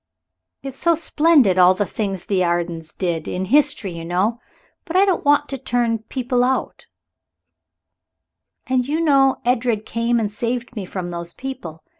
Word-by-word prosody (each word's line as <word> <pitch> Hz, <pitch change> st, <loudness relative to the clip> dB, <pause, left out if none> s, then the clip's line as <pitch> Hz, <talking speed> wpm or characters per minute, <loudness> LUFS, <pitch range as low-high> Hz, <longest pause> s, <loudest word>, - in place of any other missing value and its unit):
It's 270 Hz, -1 st, -7 dB
so 335 Hz, -1 st, +3 dB
splendid, 300 Hz, -, +3 dB
all 180 Hz, +1 st, +6 dB
the 205 Hz, -, 0 dB
things 195 Hz, -3 st, -4 dB
the 190 Hz, -2 st, +1 dB
Ardens 170 Hz, -2 st, -2 dB
did 170 Hz, -4 st, -3 dB
in 185 Hz, +1 st, -3 dB
history, 235 Hz, -5 st, +2 dB
you 165 Hz, -, -7 dB
know. 190 Hz, +8 st, 0 dB, 0.4 s
But 335 Hz, -, -7 dB
I 385 Hz, +2 st, +6 dB
don't 380 Hz, -3 st, 0 dB
want 290 Hz, 0 st, +3 dB
to 270 Hz, -, -4 dB
turn 240 Hz, -3 st, 0 dB
people 245 Hz, +2 st, -1 dB
out 260 Hz, +1 st, -2 dB, 1.8 s
and 255 Hz, -1 st, 0 dB
you 305 Hz, +3 st, -1 dB
know 275 Hz, -4 st, +3 dB
Edred 240 Hz, -3 st, 0 dB
came 235 Hz, +1 st, 0 dB
and 210 Hz, -2 st, -2 dB
saved 240 Hz, +3 st, -3 dB
me 205 Hz, -4 st, -4 dB
from 180 Hz, -1 st, -5 dB
those 170 Hz, 0 st, -6 dB
people. 245 Hz, -12 st, -7 dB
230 Hz, 160 wpm, -21 LUFS, 185-265 Hz, 1.8 s, all